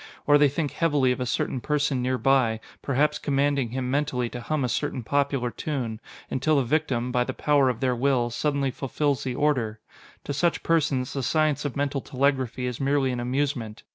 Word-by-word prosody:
Or 145 0 +5
they 145 -1 +5
think 145 +1 -2
heavily 145 -6 +2
of 125 - -2
a 125 - -2
certain 125 +2 -1
person 145 -2 0
nearby, 130 -2 +2 0.2
perhaps 145 +2 +1
commanding 140 -3 +1
him 125 +1 -3
mentally 135 -4 0
to 120 - -7
hum 155 +3 -1
a - - +1
certain 130 +1 -2
popular 140 -1 0
tune, 120 -8 -3 0.3
until 150 +4 +1
the 140 - +3
victim, 125 -3 0
by 125 -1 +2
the 130 +1 -5
power 145 -3 +3
of 125 0 -3
their 130 -2 +1
will, 125 -1 +1
suddenly 140 +1 0
fulfills 140 +2 -1
the 130 -2 -3
order. 125 -8 0 0.4
To 145 - -4
such 170 +4 0
persons, 145 -6 +1
the 135 - -2
science 155 +1 +1
of 145 - -3
mental 140 -1 -1
telegraphy 130 -2 0
is 125 +1 -4
merely 135 -1 +2
an 125 - -3
amusement. 125 -3 -2
135 Hz, 190 wpm, -25 LUFS, 125-145 Hz, 0.4 s, Or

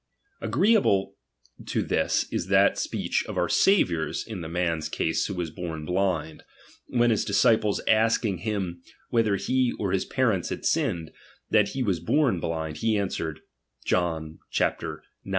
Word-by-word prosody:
Agreeable 130 - +2 0.5
to - - 0
this - - +1
is - - -2
that - - +4
speech - - -1
of - - -5
our - - +2
Saviour's 85 - +2
in 110 -6 -6
the 80 - -6
man's 85 -2 -1
case 80 +1 0
who 100 - -4
was 85 -3 -3
born 80 -3 -6
blind; 90 -3 -1 0.5
when 120 -1 +2
his 110 - +1
disciples 105 0 +2
asking 110 -3 +2
him 95 -4 -3 0.3
whether 115 -4 +2
he 125 +6 +1
or 100 -3 -2
his 95 -1 0
parents 110 -9 0
had - - -5
sinned, 95 - 0 0.4
that 105 -2 +4
he 130 - +1
was 95 -7 0
born 120 - +2
blind, 80 -2 -3
he 110 +4 +1
answered, 85 -6 -3 0.4
(John 80 -3 -1
ix. - - +2
95 Hz, 150 wpm, -26 LUFS, 85-110 Hz, 0.5 s, that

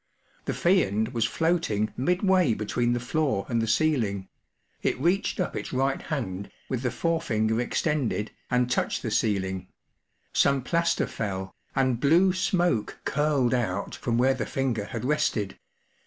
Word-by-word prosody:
The - - -2
Fiend 110 - +2
was 120 -3 0
floating 160 -9 0
midway 180 - +2
between 120 +3 0
the 120 - 0
floor 130 -4 0
and 115 -2 0
the 115 - -1
ceiling; 115 -7 +1 0.5
it - - 0
reached 180 +9 +1
up 180 - -1
its - - -4
right 135 +1 0
hand, 100 -10 -4 0.2
with 125 -2 -1
the 125 - 0
forefinger 115 -8 0
extended, 125 -5 -1 0.2
and 125 0 +2
touched 125 - -1
the 110 - -2
ceiling; 95 -4 0 0.7
some 140 -2 +3
plaster 170 +5 +1
fell, 95 -3 -4 0.2
and 130 -3 +2
blue 170 +7 +4
smoke 175 - 0
curled 145 -4 +2
out 100 -6 -1
from 115 -1 -1
where 130 +2 +4
the 115 -5 -3
finger 125 -6 -1
had 115 +2 -5
rested. 115 -8 0
125 Hz, 145 wpm, -27 LUFS, 110-155 Hz, 0.7 s, blue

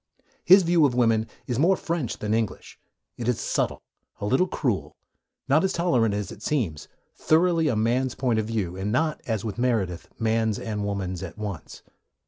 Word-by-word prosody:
His 190 +2 +7
view 170 -1 +3
of 125 - -3
women 115 -2 +2 0.2
is 125 -1 -2
more 180 +5 +4
French 165 -8 -3
than 105 0 -2
English; 110 -2 -3 0.4
it 120 - -4
is 125 -3 +1
subtle, - - -1 0.4
a - - -3
little 130 - +2
cruel, 125 - -2 0.5
not 150 +5 +4
as 190 0 +1
tolerant 125 - +2
as 105 -1 -3
it - - -11
seems, 105 - -2 0.3
thoroughly 165 0 +2
a 125 - +1
man's 120 +4 +1
point 120 -4 +1
of 110 - -2
view, 100 -6 -2
and 95 +2 -3
not, 155 +5 0
as 110 -2 -2
with 110 +1 -4
Meredith, 105 -9 0
man's 110 -1 +1
and 105 -2 -4
woman's 95 -3 -3
at - - -7
once. 100 -6 -7
115 Hz, 180 wpm, -25 LUFS, 105-150 Hz, 0.5 s, His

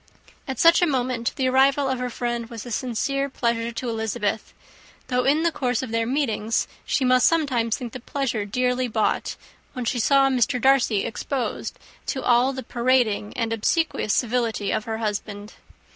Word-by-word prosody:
At 265 - -4
such 335 +1 +6
a 350 - +4
moment, 250 -4 -1
the 260 - 0
arrival 270 +2 +3
of 260 -1 -1
her 250 0 -2
friend 240 -1 -3
was 230 -1 -8
a 240 - -8
sincere 275 +4 -1
pleasure 235 -2 -1
to 245 +2 -5
Elizabeth, 220 -2 -2 0.6
though 250 -1 +1
in 300 +4 +3
the 335 - +2
course 250 -4 -1
of 250 - -6
their 230 0 0
meetings 230 -5 0 0.2
she 265 - +1
must 255 0 +5
sometimes 260 -9 +1
think 240 -3 -7
the 255 - -6
pleasure 250 -3 -2
dearly 250 +4 0
bought, 220 -2 -1 0.4
when 250 -2 -4
she 240 +1 0
saw 275 +3 +4
Mr. 250 -1 +1
Darcy 245 -5 +3
exposed 255 +2 -3 0.3
to 265 - -2
all 245 +2 +4
the 260 -1 -6
parading 235 -4 +1
and 230 -2 -1
obsequious 225 +1 0
civility 230 -4 0
of 215 - -1
her 220 -1 -3
husband. 210 -1 -4
245 Hz, 175 wpm, -24 LUFS, 225-265 Hz, 0.6 s, such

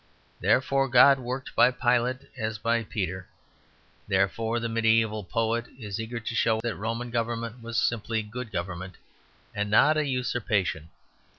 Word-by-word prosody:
Therefore 135 +1 +2
God 135 +2 +7
worked 130 +1 -5
by 125 - +6
Pilate 125 +1 0
as 110 -3 -3
by 115 +2 0
Peter. 95 -4 -4 0.8
Therefore 105 +4 +1
the 115 - -2
mediæval 110 -2 +1
poet 115 +1 0
is 105 -4 -5
eager 115 +1 -5
to 115 - -5
show 115 -1 +2
that 115 -3 -2
Roman 115 +5 -4
government 115 0 -3
was 115 0 -4
simply 115 -1 0
good 115 +2 -7
government, 90 +1 -5 0.6
and 105 0 -2
not 150 +9 +5
a 155 - +1
usurpation. 110 - -1
115 Hz, 140 wpm, -27 LUFS, 105-120 Hz, 0.8 s, God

